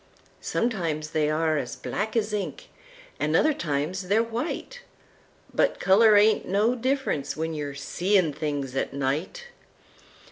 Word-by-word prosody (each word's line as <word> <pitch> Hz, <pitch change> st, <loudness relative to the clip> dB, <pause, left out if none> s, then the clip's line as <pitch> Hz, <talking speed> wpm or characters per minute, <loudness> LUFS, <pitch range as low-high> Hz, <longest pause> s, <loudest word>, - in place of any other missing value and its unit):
Sometimes 165 Hz, -10 st, -2 dB
they 150 Hz, -2 st, +1 dB
are 155 Hz, 0 st, +1 dB
as 125 Hz, -, -5 dB
black 220 Hz, +3 st, -3 dB
as 210 Hz, -1 st, 0 dB
ink, 205 Hz, -2 st, -4 dB, 0.5 s
an' -, -, 0 dB
other 310 Hz, -, +4 dB
times 170 Hz, -, -2 dB
they're 215 Hz, +4 st, +3 dB
white—But 330 Hz, -, -4 dB
color 210 Hz, +2 st, +6 dB
ain't 215 Hz, +1 st, +4 dB
no 210 Hz, +5 st, +2 dB
difference 250 Hz, -, -1 dB
when 160 Hz, +1 st, -2 dB
you 145 Hz, -2 st, -4 dB
see 185 Hz, +8 st, +1 dB
things 145 Hz, -3 st, -3 dB
at 135 Hz, -, -2 dB
night! 150 Hz, -, -2 dB
185 Hz, 130 wpm, -26 LUFS, 150-225 Hz, 0.5 s, color